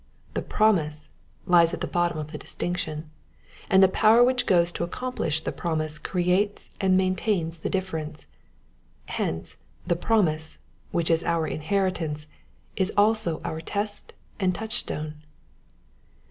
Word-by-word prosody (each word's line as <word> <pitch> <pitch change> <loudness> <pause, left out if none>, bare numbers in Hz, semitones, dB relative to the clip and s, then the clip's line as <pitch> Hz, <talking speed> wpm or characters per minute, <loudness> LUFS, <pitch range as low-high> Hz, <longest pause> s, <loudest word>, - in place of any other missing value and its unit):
The - - -1
promise 155 -9 +1 0.3
lies 175 -3 +5
at - - -12
the - - 0
bot 175 0 +1
tom 165 - -6
of 155 -1 -5
the - - -5
distinction, 155 -3 -4 0.6
and 190 0 +6
the - - +8
power 220 +5 +5
which 250 0 +2
goes 175 -2 +4
to 170 - -3
accomplish 170 -5 -2
the - - -2
promise 155 -2 -2
creates 185 +5 0
and 190 -1 +4
maintains 185 -3 0
the - - -3
difference. 160 -5 -3 0.8
Hence 80 0 -3 0.3
the 175 - +1
promise^ 165 -6 +1 0.3
which 170 -1 0
is 165 0 +2
our 170 -1 +1
inheritance, 155 -2 -1 0.5
is 190 +1 +1
also 205 -6 +3
our 160 - -3
test 205 +4 -3 0.3
and 185 -2 +1
touchstone. 155 -9 -3
175 Hz, 135 wpm, -26 LUFS, 160-195 Hz, 0.8 s, the